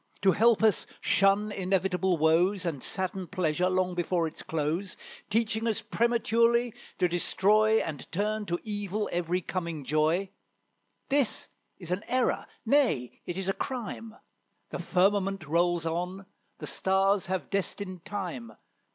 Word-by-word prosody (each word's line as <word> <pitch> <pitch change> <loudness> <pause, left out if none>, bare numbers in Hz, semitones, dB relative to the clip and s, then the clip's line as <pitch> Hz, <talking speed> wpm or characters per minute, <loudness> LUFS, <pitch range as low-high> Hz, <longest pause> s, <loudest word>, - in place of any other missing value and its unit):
To 195 - +6
help 225 +2 +4
us 220 -3 +3
shun 200 +2 +3
inevitable 190 -1 0
woes, 175 +5 +3
And 155 -6 -2
sadden 190 -1 -2
pleasure 180 -1 0
long 185 0 +1
before 175 -1 0
its 160 - -5
close; 160 +4 -2 0.3
Teaching 220 +1 0
us 220 - -1
prematurely 235 0 +2 0.2
to 180 - +3
destroy, 210 +5 +3
And 150 -4 -6
turn 210 +3 -1
to 175 - 0
evil 205 -1 -3
every 175 +1 0
coming 170 -4 -4
joy, 155 +7 +1 0.8
This 270 -6 +1 0.3
is 175 -3 -8
an 185 +4 -1
error, 255 0 0 0.2
nay, 230 - +1
it 175 - -3
is 190 -1 -3
a 195 - +2
crime. 230 -3 -5 0.6
The - - -4
firmament 195 -1 +1
rolls 170 +2 +1
on, 180 +4 -3 0.3
the 150 - -7
stars 190 +6 +1
have 185 -1 -3
destined 190 -2 -2
time. 175 - -5
190 Hz, 135 wpm, -28 LUFS, 175-210 Hz, 0.8 s, To